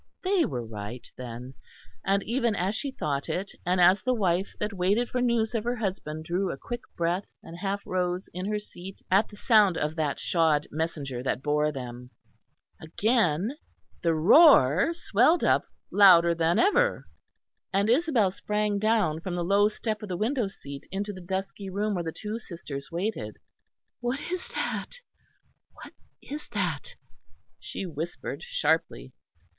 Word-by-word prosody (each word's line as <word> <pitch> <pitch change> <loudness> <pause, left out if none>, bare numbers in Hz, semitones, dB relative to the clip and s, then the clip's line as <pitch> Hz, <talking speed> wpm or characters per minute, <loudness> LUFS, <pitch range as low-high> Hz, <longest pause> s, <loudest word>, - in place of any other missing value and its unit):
They 375 -2 +3
were 125 -5 -4
right, 110 +2 -7
then; 125 +1 -8 0.5
and 195 0 +1
even 235 -2 0
as 190 +2 0
she 275 +5 -2
thought 145 - -3
it, 190 +2 -2 0.2
and 180 +1 +2
as 180 +2 +6
the 255 0 +1
wife 190 -3 0
that 210 0 -2
waited 200 +6 +1
for 250 - -1
news 235 -2 +1
of 225 -2 -1
her 240 +1 -1
husband 180 -8 -4
drew 180 +3 -1
a - - -6
quick 240 - -6 0.2
breath 175 +3 0 0.2
and 170 +1 -10
half 200 +1 -3
rose 180 0 -1
in 185 +2 -4
her 210 0 0
seat 195 -2 -10
at 195 +3 +4
the 210 - -12
sound 210 -7 +4
of 150 +1 -1
that 150 -3 0
shod 160 -4 +2
messenger 150 -5 -3
that 130 0 -2
bore 150 +1 +1
them, 125 -2 -7 0.7
again 205 - +1 0.5
the 165 -1 +2
roar 180 - +6
swelled 310 - +3
up - - +3 0.3
louder 175 -4 +7
than 165 +1 +1
ever; - - +3 0.7
and 200 +1 +2
Isabel 245 - +3
sprang 210 +1 -1
down 215 -7 +2
from 175 +1 -4
the 175 - -1
low 200 +3 +4
step 215 0 -3
of 210 - -7
the 180 - -2
window 235 +2 0
seat 140 -7 -9
into 200 +2 -3
the 185 - -9
dusky 190 +2 -4
room 205 +3 -1
where 175 -3 -2
the 165 - -3
two 215 +6 -5
sisters 140 -9 -7
waited. 170 - -3 0.6
"What 245 +3 -2
is 365 0 -3
that? - - -3 0.8
What - - -12 0.3
is 295 +2 -7
that?" - - -2 0.6
she - - -6
whispered 165 0 -5
sharply. - - -1
190 Hz, 160 wpm, -27 LUFS, 160-220 Hz, 0.8 s, louder